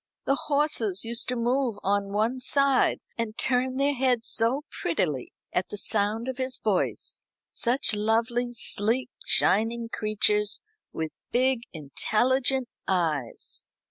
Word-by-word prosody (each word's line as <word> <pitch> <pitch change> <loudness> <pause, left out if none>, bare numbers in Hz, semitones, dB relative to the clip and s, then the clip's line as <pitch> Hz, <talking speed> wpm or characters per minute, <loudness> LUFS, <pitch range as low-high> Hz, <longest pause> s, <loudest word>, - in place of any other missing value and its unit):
The 275 - +3
horses 280 -9 0
used 235 +1 0
to 250 - -1
move 245 -1 0
on 200 0 0
one 220 +5 0
side, 275 +1 +2 0.2
and 225 -1 -2
turn 255 0 +2
their 280 +1 +2
heads 250 -3 +1
so 240 +6 +1
prettily 150 -6 -1 0.2
at 180 - 0
the 205 - -5
sound 215 +3 +1
of 260 -1 -3
his 260 0 0
voice 205 -4 -1 0.3
such 250 0 +2
lovely, 230 +3 +1
sleek, 235 +2 0
shining 230 +3 +3
creatures, 210 -1 +1 0.3
with 160 -1 -4 0.2
big 255 0 +2
intelligent 250 - +1 0.2
eyes." 155 -10 -1
230 Hz, 125 wpm, -27 LUFS, 205-255 Hz, 0.3 s, The